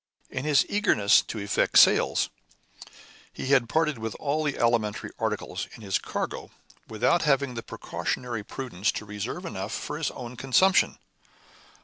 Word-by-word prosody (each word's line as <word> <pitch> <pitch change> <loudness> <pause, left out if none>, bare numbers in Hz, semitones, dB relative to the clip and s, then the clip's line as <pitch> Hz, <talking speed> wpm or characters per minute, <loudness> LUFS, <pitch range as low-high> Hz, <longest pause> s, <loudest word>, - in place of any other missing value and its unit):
In 130 +2 -4
his 150 -3 +4
eagerness 110 - +4
to - - -7
effect 100 -1 +1
sales, - - +5 1.0
he 130 - -6
had 130 -4 +4
parted 155 -4 +1
with 110 -1 -4
all 150 +2 -1
the 145 -2 -1
alimentary 115 -3 0
articles - - -3
in 115 - -13
his 95 -2 0
cargo - - -4 0.4
without 110 +10 +2
having 140 -3 +2
the 115 - -5
precautionary 120 -1 -4
prudence 110 -3 -2
to 110 - -5
reserve 105 - -5
enough 100 - -5
for 150 - -4
his 160 - 0
own 120 0 -8
consumption. 185 +10 +3
125 Hz, 145 wpm, -26 LUFS, 110-145 Hz, 1.0 s, sales